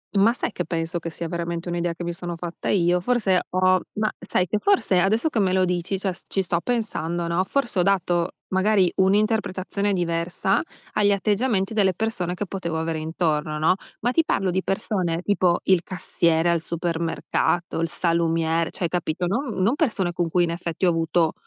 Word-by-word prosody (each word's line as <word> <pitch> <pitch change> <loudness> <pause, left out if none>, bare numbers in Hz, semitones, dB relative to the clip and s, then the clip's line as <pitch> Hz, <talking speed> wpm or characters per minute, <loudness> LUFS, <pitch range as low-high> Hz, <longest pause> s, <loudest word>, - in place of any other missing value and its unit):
Ma 200 +4 +5
sai 245 - -2
che - - -2
penso 165 0 -2
che 165 - -5
sia 170 +1 -5
veramente 170 0 -4
un'idea 175 0 -1
che 175 - -7
mi 175 - -2
sono 175 0 -6
fatta 170 0 -5
io? 180 -2 +3
Forse 200 -5 +2
ho 185 0 +3
ma 215 0 0
sai 180 -1 -1
che 210 - 0
forse, 210 - +2
adesso 220 - +2
che 230 - -1
me 190 -2 +2
lo 185 0 +3
dici, 180 +2 -2
cioè, 190 -2 -1
s - - -12
ci 195 - 0
sto 175 -2 0
pensando, 175 -8 -1
no? 170 +2 +1
Forse 240 -3 -1
ho - - +4
dato, 175 -3 +1 0.2
magari, 190 -1 +3
un'interpretazione 200 0 +1
diversa 175 +1 0 0.3
agli 205 -1 +3
atteggiamenti 205 +1 +1
delle 195 -4 +3
persone 180 -4 -2
che 205 - -3
potevo 170 -4 -3
avere 160 -1 -2
intorno, 155 -1 -1
no? 160 +4 +3 0.2
Ma 245 +2 +1
ti 325 +4 +3
parlo 195 -1 0
di 185 +1 0
persone 180 -3 -1
tipo 185 -4 +2
il 185 -2 +3
cassiere 170 -2 +1
al 170 -2 +2
supermercato, 170 0 -1
il 165 - 0
salumiere, 165 -1 +1
cioè, 175 - -2
capito, 175 0 -2
non 225 -1 -2
non 230 +9 +3
persone 210 - 0
con 170 -1 -1
cui, 175 +1 +3
in 165 - 0
effetti, 170 +1 -2
ho - - +5
avuto 165 0 +1
180 Hz, 190 wpm, -24 LUFS, 170-195 Hz, 0.3 s, Ma